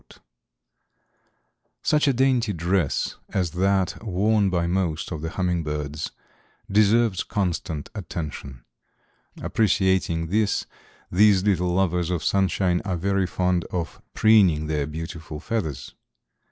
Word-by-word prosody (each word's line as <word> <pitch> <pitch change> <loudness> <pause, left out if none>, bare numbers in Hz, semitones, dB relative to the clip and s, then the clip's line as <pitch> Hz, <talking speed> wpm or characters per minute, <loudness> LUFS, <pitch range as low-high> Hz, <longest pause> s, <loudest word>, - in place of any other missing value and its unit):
SCIENCES.] - - -18 1.6
Such 150 -1 +2
a 140 - +4
dainty 125 -4 +2
dress 85 -3 0
as 90 -4 -1
that 95 +3 0
worn 105 0 +2
by 85 -2 0
most 85 -2 -1
of 80 -3 -4
the 80 - -3
hummingbirds 75 -4 -2 0.6
deserves 105 -1 +3
constant 90 -6 -3
attention. 75 - -6 0.8
Appreciating 95 -6 +1
this 105 +2 +1 0.5
these 100 0 +5
little 90 -3 +1
lovers 90 -2 +1
of 85 -3 -2
sunshine 95 -2 +1
are 95 -3 -2
very 95 +1 0
fond 90 -1 0
of 85 -2 -5
preening 95 -9 +5
their 75 -2 -1
beautiful 80 0 -7
feathers. 80 - -4
90 Hz, 115 wpm, -24 LUFS, 80-100 Hz, 1.6 s, these